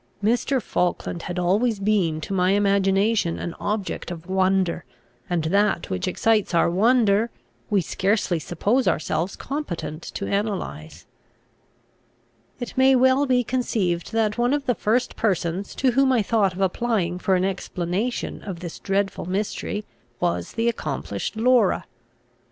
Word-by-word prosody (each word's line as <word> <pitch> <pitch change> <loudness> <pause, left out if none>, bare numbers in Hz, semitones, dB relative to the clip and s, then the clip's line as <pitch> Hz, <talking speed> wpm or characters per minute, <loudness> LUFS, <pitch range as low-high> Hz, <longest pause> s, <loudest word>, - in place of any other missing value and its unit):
Mr. 245 +5 +2
Falkland 180 -4 -2
had 175 +1 -5
always 205 +6 +2
been 195 -6 +1
to 160 - -5
my 185 0 +3
imagination 200 -1 +2
an 170 - -4
object 205 -4 -3
of 170 -1 -8
wonder, 190 -2 +1 0.5
and 175 -3 0
that 200 +5 +1
which 185 0 -2
excites 210 0 +1
our 170 0 +3
wonder 220 +2 +3 0.4
we 205 -3 +3
scarcely 190 0 0
suppose 210 - 0
ourselves 165 +4 0
competent 175 - -5
to 200 - -5
analyse. 195 - -3 1.5
It 245 - -6
may 265 0 +5
well 260 +2 +4
be 250 -1 +3
conceived, 210 -9 -1
that 220 0 +1
one 245 +4 +3
of 285 -1 -3
the 245 - +2
first 230 +3 0
persons 190 -3 -1
to 260 -1 +2
whom 270 +2 +3
I 240 -4 +3
thought 200 -3 +2
of 185 - -6
applying 190 -3 0
for 190 +1 +2
an 185 0 +1
explanation 190 +4 -3
of 190 -4 -6
this 170 -2 -7
dreadful 195 -2 -1
mystery 205 +2 -3 0.3
was 85 0 -1
the 230 +1 0
accomplished 145 - -3
Laura. 245 +2 +3
200 Hz, 140 wpm, -24 LUFS, 180-230 Hz, 1.5 s, may